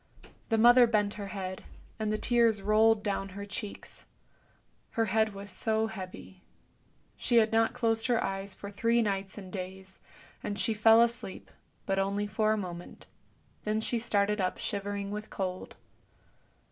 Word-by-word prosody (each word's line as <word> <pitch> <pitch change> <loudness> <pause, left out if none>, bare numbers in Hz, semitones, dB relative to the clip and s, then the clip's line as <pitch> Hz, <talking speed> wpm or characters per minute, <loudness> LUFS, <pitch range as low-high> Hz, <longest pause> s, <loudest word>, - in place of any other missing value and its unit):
The 225 - +2
mother 240 +2 +7
bent 210 -2 +1
her 205 -1 -6
head, 190 -2 -5 0.4
and 215 -1 -1
the 215 - 0
tears 230 -3 +2
rolled 215 +1 +4
down 195 -1 -2
her 200 - -5
cheeks. 205 +1 -6 0.9
Her 225 - +3
head 220 0 +1
was 200 0 -8
so 220 +4 +1
heavy, 190 -3 -8 0.7
she 240 - -1
had 225 -1 +5
not 225 0 +2
closed 225 -1 +1
her 240 -2 +2
eyes 195 0 -3
for 200 - -8
three 230 +3 +2
nights 195 -2 -2
and 190 -3 -9
days, 190 0 -7 0.4
and 205 - -4
she 205 +3 +1
fell 225 +2 +6
asleep, 235 -5 -4 0.3
but 195 0 0
only 200 +1 0
for 215 +1 +1
a 215 - +2
moment, 175 -3 -7 0.6
then 215 +1 0
she 230 +2 -1
started 210 -2 +1
up 185 0 -1
shivering 200 -1 -3
with 210 +1 -5
cold. 185 -1 -4
210 Hz, 160 wpm, -30 LUFS, 195-225 Hz, 0.9 s, mother